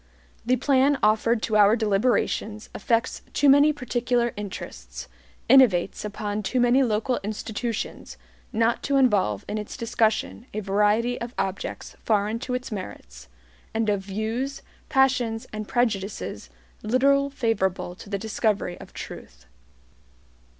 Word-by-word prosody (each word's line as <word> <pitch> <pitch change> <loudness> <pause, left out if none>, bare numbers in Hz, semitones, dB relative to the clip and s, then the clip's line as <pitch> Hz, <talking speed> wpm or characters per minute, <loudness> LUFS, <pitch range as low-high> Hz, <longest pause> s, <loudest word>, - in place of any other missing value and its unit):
The 255 - +4
plan 270 +2 +3
offered 220 +2 +3
to 220 - 0
our 205 +1 +6
deliberations 215 0 0
affects 230 +4 0
too 290 - +3
many 285 +2 +7
particular 240 -3 -1
interests, 60 - -7 0.4
innovates 220 -8 +4
upon 210 0 -3
too 250 +5 -1
many 245 +2 +4
local 240 +1 0
institutions, 215 - -4 0.3
not 230 +1 +1
to 280 - -1
involve 205 - +2
in 215 - -3
its 210 - -7
discussion 230 0 0
a - - 0
variety 210 +4 +1
of 235 +1 -6
objects 190 0 -4
foreign 215 +1 +1
to 250 0 -3
its 250 0 -5
merits, 70 - -8 0.5
and 225 -1 +1
of 200 -1 0
views, 220 +8 -3 0.3
passions 250 -4 +2
and 215 -1 -5
prejudices 215 -5 -2 0.3
little 275 +5 +3
favorable 225 -9 -1
to 190 - -13
the 200 - -1
discovery 210 -3 -1
of - - -12
truth. - - -10
220 Hz, 130 wpm, -25 LUFS, 205-250 Hz, 0.5 s, many